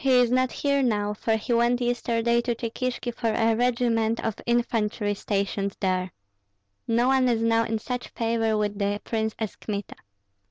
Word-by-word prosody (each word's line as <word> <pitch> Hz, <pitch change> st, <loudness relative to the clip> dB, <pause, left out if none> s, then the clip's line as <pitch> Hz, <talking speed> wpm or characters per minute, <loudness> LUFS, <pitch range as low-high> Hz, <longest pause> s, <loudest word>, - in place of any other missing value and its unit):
"He 265 Hz, -2 st, +5 dB
is 245 Hz, -1 st, +3 dB
not 255 Hz, 0 st, +2 dB
here 280 Hz, -1 st, +1 dB
now, 210 Hz, -4 st, +1 dB
for 220 Hz, +1 st, 0 dB
he 230 Hz, +3 st, -2 dB
went 235 Hz, +1 st, +3 dB
yesterday 235 Hz, -1 st, +1 dB
to 240 Hz, 0 st, -1 dB
Cheykishki 240 Hz, +1 st, -3 dB
for 230 Hz, -1 st, -1 dB
a 225 Hz, 0 st, +2 dB
regiment 230 Hz, -2 st, +1 dB
of 225 Hz, -, 0 dB
infantry 225 Hz, -3 st, 0 dB
stationed 200 Hz, -1 st, -2 dB
there. 185 Hz, -1 st, 0 dB, 0.8 s
No 235 Hz, +1 st, +2 dB
one 260 Hz, -1 st, +3 dB
is 230 Hz, -1 st, +1 dB
now 230 Hz, 0 st, +3 dB
in 225 Hz, -, -1 dB
such 245 Hz, +3 st, -4 dB
favor 225 Hz, -1 st, 0 dB
with 205 Hz, -1 st, -1 dB
the 205 Hz, 0 st, 0 dB
prince 220 Hz, -1 st, -2 dB
as 220 Hz, -3 st, -4 dB
Kmita. 205 Hz, -2 st, -5 dB
230 Hz, 170 wpm, -26 LUFS, 215-240 Hz, 0.8 s, He